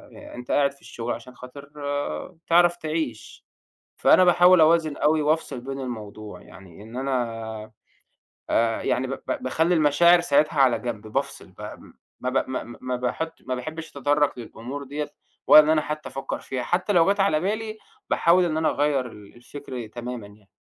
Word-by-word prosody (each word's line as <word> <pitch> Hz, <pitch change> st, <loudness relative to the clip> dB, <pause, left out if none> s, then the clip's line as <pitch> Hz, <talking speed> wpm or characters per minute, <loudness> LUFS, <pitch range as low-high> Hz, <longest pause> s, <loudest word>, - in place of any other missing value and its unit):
ي -, -, -11 dB
أنت 125 Hz, 0 st, -7 dB
قاعد 140 Hz, -1 st, +3 dB
في 140 Hz, -, -24 dB
الشغل 120 Hz, +1 st, -5 dB
عشان 125 Hz, +2 st, -10 dB
خاطر 140 Hz, +3 st, -11 dB, 0.8 s
تعرف 175 Hz, +1 st, +5 dB
تعيش، 155 Hz, -8 st, -5 dB, 0.5 s
فأنا 185 Hz, -, +5 dB
باحاول 180 Hz, 0 st, +6 dB
أوازن 160 Hz, -2 st, +3 dB
أوي 155 Hz, +1 st, +2 dB
وافصل 150 Hz, -3 st, 0 dB
بين 135 Hz, +1 st, -6 dB
الموضوع 110 Hz, -4 st, -7 dB
يعني 95 Hz, 0 st, -14 dB
إن 115 Hz, +3 st, -10 dB
أنا 115 Hz, -5 st, -3 dB, 0.8 s
آآ، 115 Hz, -1 st, +1 dB
يعني 130 Hz, +1 st, 0 dB
ب 130 Hz, -, -5 dB
ب -, -, -5 dB
باخلّي 160 Hz, +7 st, +1 dB
المشاعر 170 Hz, +3 st, +5 dB
ساعتها 155 Hz, -2 st, +2 dB
على 130 Hz, -3 st, +4 dB
جَنْب، 110 Hz, -3 st, -5 dB
بافصل 110 Hz, -, -3 dB
ب -, -, -15 dB
م -, -, -10 dB, 0.3 s
ما 130 Hz, -, -1 dB
ب 130 Hz, 0 st, 0 dB
ما 130 Hz, -, -3 dB
ما 120 Hz, -, -11 dB
ما 125 Hz, 0 st, -2 dB
باحط 160 Hz, +6 st, -3 dB
ما 130 Hz, 0 st, -3 dB
باحبّش 155 Hz, +6 st, -7 dB
أتطرّق 145 Hz, 0 st, +1 dB
للأمور 120 Hz, +4 st, -7 dB
دِيَّة 145 Hz, +2 st, -5 dB, 0.4 s
ولا 155 Hz, -, +10 dB
إن 150 Hz, -, -1 dB
أنا 155 Hz, -1 st, +3 dB
حتّى 150 Hz, 0 st, -5 dB
أفكّر 135 Hz, -, -5 dB
فيها 130 Hz, -2 st, -4 dB
حتّى 180 Hz, -, 0 dB
لو 175 Hz, +3 st, +5 dB
جَت 200 Hz, -, -13 dB
على 195 Hz, -6 st, +3 dB
بالي 215 Hz, +4 st, -3 dB, 0.3 s
باحاول 180 Hz, +2 st, +4 dB
إن 155 Hz, -2 st, -1 dB
أنا 160 Hz, -, +2 dB
أغيّر 145 Hz, -3 st, +1 dB
ال 105 Hz, -1 st, -14 dB
الفكر 125 Hz, -1 st, -8 dB
تمامًا 120 Hz, -1 st, -7 dB
يعني. 100 Hz, -1 st, -20 dB
140 Hz, 175 wpm, -24 LUFS, 120-160 Hz, 0.8 s, ولا